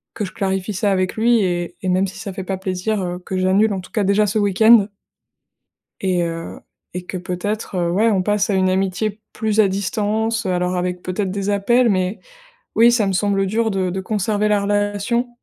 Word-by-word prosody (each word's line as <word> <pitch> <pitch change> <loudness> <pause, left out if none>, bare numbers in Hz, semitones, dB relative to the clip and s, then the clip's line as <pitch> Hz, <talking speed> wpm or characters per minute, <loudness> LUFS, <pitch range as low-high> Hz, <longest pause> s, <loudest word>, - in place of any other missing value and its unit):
que 210 - -2
je 190 - -7
clarifie 195 +1 -2
ça 200 +2 +1
avec 185 -1 0
lui 230 +1 +3
et 175 -2 -2
et 185 - -2
même 185 +2 +2
si - - -10
ça 200 -3 -6
fait 190 - -6
pas 190 0 -3
plaisir, 190 +3 -2
heu, 180 -1 -3
que 185 +1 -4
j'annule 195 +3 +3
en 190 - -3
tout 180 - -15
cas, 215 - 0
déjà 200 +2 +3
ce 210 +2 0
week-end. 205 +2 +5 1.1
Et 185 -2 +1
heu 165 0 -5 0.3
et 180 0 -5
que - - -5
peut-être, 185 +3 -4
heu, 175 -1 0
ouais, 215 +6 +3
on 190 -3 +1
passe 210 +1 +1
à - - +1
une 185 -1 +2
amitié 195 +3 -1
plus 220 -1 +1
à 200 - +4
distance, 215 +3 -1
heu, 190 - -1
alors, 180 0 0
avec, 180 0 -2
peut-être, 185 +1 -2
des 195 +1 -3
appels 235 +5 +3
mais 185 0 0 0.6
oui, 235 +2 +6
ça 225 -4 +2
me - - 0
semble 195 +1 +1
dur 220 +3 0
de 190 -2 -1
de 190 +2 -3
conserver 210 +1 0
la 205 -1 +2
relation 205 +4 0
195 Hz, 215 wpm, -20 LUFS, 185-210 Hz, 1.1 s, oui